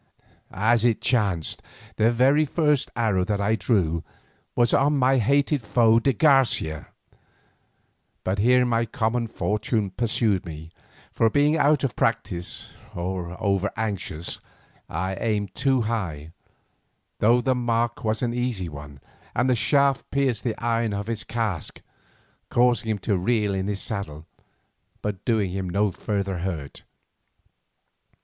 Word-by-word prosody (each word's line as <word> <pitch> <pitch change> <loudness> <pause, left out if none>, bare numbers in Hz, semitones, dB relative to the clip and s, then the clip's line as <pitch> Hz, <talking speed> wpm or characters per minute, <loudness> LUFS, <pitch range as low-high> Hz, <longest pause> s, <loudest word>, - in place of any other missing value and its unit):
As 115 +4 +2
it 120 -3 +2
chanced, 100 -10 0 0.4
the 110 +1 +4
very 135 +6 +4
first 150 -2 +1
arrow 105 -6 +1
that 105 0 -1
I 100 +2 +1
drew 90 -7 0 0.5
was 120 -1 +3
on 145 +1 +3
my 130 0 +3
hated 140 +4 +2
foe 115 0 +4
de 135 +4 +2
Garcia, 130 - +2 1.4
but 95 +2 -1
here 125 +4 +4
my 115 -1 +1
common 115 +2 -1
fortune 105 -1 -1
pursued 110 -3 +1
me, 80 -1 -9 0.4
for 115 - +2
being 145 +6 +3
out 150 -2 +3
of 130 -6 -1
practice, 90 +1 -2 0.2
or 90 0 -4
over 100 -1 +1
anxious, 100 -6 -3 0.5
I 95 +1 -2
aimed 105 -3 -1
too 130 -1 +1
high, 90 -10 -3 0.9
though 115 +3 +4
the 130 +1 +1
mark 120 -1 -1
was 110 +1 -1
an 120 -1 0
easy 120 -8 -2
one, 70 -2 -10 0.3
and 125 - +2
the 130 - +3
shaft 140 +3 +2
pierced 135 -5 0
the 115 -3 -2
iron 115 -2 0
of 100 0 -3
his 115 -1 -3
casque, 110 -8 -3 0.7
causing 120 -2 +2
him 110 - 0
to 100 -4 +1
reel 105 +1 +1
in 95 0 -2
his 100 -1 -2
saddle, 80 -8 -5 0.8
but 105 -3 -4
doing 110 -6 +1
him 95 -1 -3
no 100 +3 +1
further 100 -1 -3
hurt. 85 -6 -5
110 Hz, 140 wpm, -24 LUFS, 95-120 Hz, 1.4 s, the